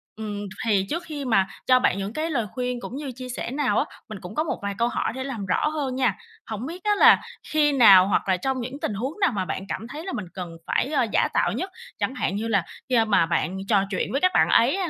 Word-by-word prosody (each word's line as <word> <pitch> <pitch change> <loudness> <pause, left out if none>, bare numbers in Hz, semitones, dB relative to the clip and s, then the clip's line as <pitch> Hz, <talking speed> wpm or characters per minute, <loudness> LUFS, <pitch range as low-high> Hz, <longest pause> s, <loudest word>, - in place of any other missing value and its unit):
Ừm, 210 -1 -5 0.3
thì 200 -4 +2
trước 340 +3 -2
khi 295 -4 -6
mà 195 -6 +3 0.2
cho 255 0 +6
bạn 195 - +2
những 200 +2 -4
cái 315 +4 -2
lời 245 -8 0
khuyên 250 -1 -2
cũng 245 - -7
như 280 -1 -5
chia 255 +1 -8
sẻ 245 -1 -4
nào 265 -6 +1
á, - - +1 0.2
mình 215 -3 -7
cũng 180 +4 -9
có 310 - +1
một 325 - -3
vài 200 0 -2
câu 235 - +2
hỏi 240 - -1
để 260 - -4
làm 245 -7 -5
rõ 185 +9 +1
hơn 290 -4 -2
nha. 260 -1 +1 0.3
Hổng 220 +2 -5
biết 345 +5 -7
á 420 - +2
là - - +7 0.3
khi 300 -1 +3
nào 200 -9 +7
hoặc 200 - +1
là 185 - +3
trong 265 +6 -2
những 255 +4 -6
tình - - -1
huống 260 - -4
nào 390 - +3
mà 190 -2 -1
bạn 190 - -4
cảm 225 - -4
thấy 305 +7 -8
là 380 - -4
mình 210 - -4
cần 175 -3 -7
phải, - - +1
ơ, 270 -5 +2
giả - - +3
tạo - - +2
nhất? 375 - -3 0.3
Chẳng 260 - -1
hạn 200 - -1
như 220 +3 -2
là 200 -5 +2 0.3
khi, 255 - +2
a, 225 -1 +4
mà 200 -6 +3
bạn 170 +2 -1
trò 200 -3 +4
chuyện 190 - -2
với 275 - 0
các 370 - +4
bạn - - +4
ấy - - +4
hay 370 -3 -1
245 Hz, 280 wpm, -24 LUFS, 200-285 Hz, 0.3 s, là